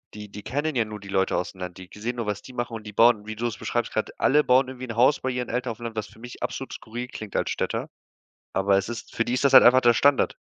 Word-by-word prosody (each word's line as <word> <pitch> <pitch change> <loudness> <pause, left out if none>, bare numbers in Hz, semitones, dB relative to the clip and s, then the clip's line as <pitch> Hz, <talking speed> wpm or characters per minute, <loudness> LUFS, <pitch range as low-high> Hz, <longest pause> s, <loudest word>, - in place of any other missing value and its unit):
die 105 0 -8
die 105 - -8
kennen 145 +2 -2
ja 115 -3 +2
nur 105 -1 -8
die 100 - -12
Leute 95 -1 +1
aus 90 - -2
dem 95 - -15
Land. 90 -1 -6
Die 95 -1 -10
ge 105 - -14
sehen 120 +3 -2
nur, 115 -2 -3
was 105 -1 -3
die 130 - -12
machen 120 -1 -4
und 110 -1 -6
die 105 - -8
bauen, 110 -1 +4
wie 110 - -5
du 115 +2 -3
das 115 -3 -2
beschreibst - - -2
grad - - -3
alle 150 +2 +4
bauen 130 0 +4
irgendwie 130 0 -7
'n 115 - -6
Haus 130 +5 +4
bei 130 - -2
ihren 125 -1 -3
Eltern 125 0 -2
auf 110 - -8
dem 120 - -11
Land, 115 -1 -5
was 105 -1 -2
für - - -19
mich 120 +1 -10
absolut - - -4
skurril 120 +3 -6
klingt 110 -5 -9
als - - 0
Städter. - - -2 0.6
Aber 95 0 +3
es 100 +2 -2
ist 120 -1 -7
für 115 - +2
die 120 - -3
ist 125 - 0
das 135 - +3
halt 130 - +10
einfach 130 +1 +7
der 120 -1 +5
Standard. 140 +4 +3
115 Hz, 315 wpm, -25 LUFS, 105-125 Hz, 0.6 s, halt